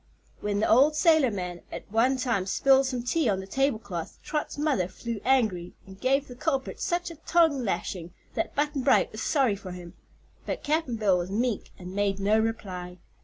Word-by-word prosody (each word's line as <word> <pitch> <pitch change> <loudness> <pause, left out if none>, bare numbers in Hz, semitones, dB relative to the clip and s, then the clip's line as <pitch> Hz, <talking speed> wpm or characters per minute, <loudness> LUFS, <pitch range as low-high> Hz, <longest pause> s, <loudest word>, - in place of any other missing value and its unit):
When 205 -1 -1
the - - +2
old 280 +7 +5
sailorman 230 - +2
at - - -6
one 245 +5 +3
time 235 -7 0
spilled 270 +5 +4
some 250 -2 -3
tea 270 +1 +1
on 195 -2 +1
the 190 - -6
tablecloth 215 - -2
Trot's 300 -1 -3
mother 290 - +1
flew 230 +2 -6
angry 215 -10 +1
and 190 0 -14
gave 270 +2 +2
the 245 - -9
culprit 270 0 -2
such 350 0 -1
a - - -9
tongue 320 -4 +2
lashing 175 -3 -3 0.2
that - - -2
Button 295 -1 0
Bright 260 +1 +3
was 215 - -7
sorry 265 -9 +2
for 190 -2 -8
him. 175 -1 -9 0.5
But - - -3
Cap'n 305 -5 0
Bill 200 -5 +2
was 175 +1 -4
meek 225 +2 -1
and 180 0 -9
made 200 -1 0
no 210 +3 +3
reply. 185 -5 -3
230 Hz, 185 wpm, -27 LUFS, 190-275 Hz, 0.5 s, old